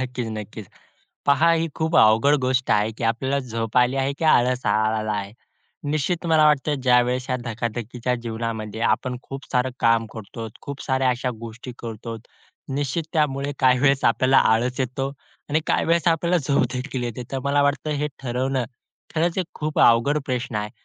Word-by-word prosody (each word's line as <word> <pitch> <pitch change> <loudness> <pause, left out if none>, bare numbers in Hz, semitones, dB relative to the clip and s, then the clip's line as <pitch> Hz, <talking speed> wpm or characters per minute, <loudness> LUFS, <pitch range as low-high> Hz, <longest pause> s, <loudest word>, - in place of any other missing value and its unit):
नक्कीचं, 125 -3 -3
नक्कीचं. 105 -1 -8 0.6
पहा 145 +4 +4
ही 165 0 +1
खूप 160 +1 0
अवघड 110 +7 +5
गोष्ट 130 0 0
आहे, 105 +1 +3
की - - -3
आपल्याला 130 +5 0
झोप 115 -4 -4
आली 125 +2 +3
आहे, 135 +1 0
की - - -2
आळस 125 -4 +3
आला 110 +1 +1
आहे. 100 -1 -4 0.6
निश्चित 160 +4 -1
मला 160 -2 +4
वाटतं 150 0 +2
ज्यावेळेस 125 0 +3
ह्या 130 - 0
धकाधकीच्या 120 +1 -3
जीवनामध्ये, 110 -2 -4
आपण 120 +2 0
खूप 135 0 -8
सारं 125 +1 +1
काम 115 0 +3
करतोत, 110 +1 -8
खूप 140 -1 -7
साऱ्या 130 -1 +1
अशा 125 +1 -1
गोष्टी 115 +2 -8
करतोत. 115 0 -7 0.5
निश्चित 145 +3 -1
त्यामुळे 145 -3 0
काही 130 -1 +4
वेळेस 135 0 +2
आपल्याला 130 +3 +4
आळस 125 +4 0
येतो 130 +1 -2 0.4
आणि 150 +2 +1
काही - - +1
वेळेस 170 -1 +2
आपल्याला 170 +2 +2
झोपदेखील 130 -2 -1
येते. 120 +1 -4
तर 135 - -1
मला 140 +1 +2
वाटतं 145 +2 0
हे 150 - 0
ठरवणं 130 +1 -1 0.5
खरचं 170 +3 +1
एक 180 - -3
खूप 155 0 -3
अवघड 120 +6 +5
प्रश्न 125 -2 -2
आहे. 105 0 -3
125 Hz, 165 wpm, -23 LUFS, 115-140 Hz, 0.6 s, अवघड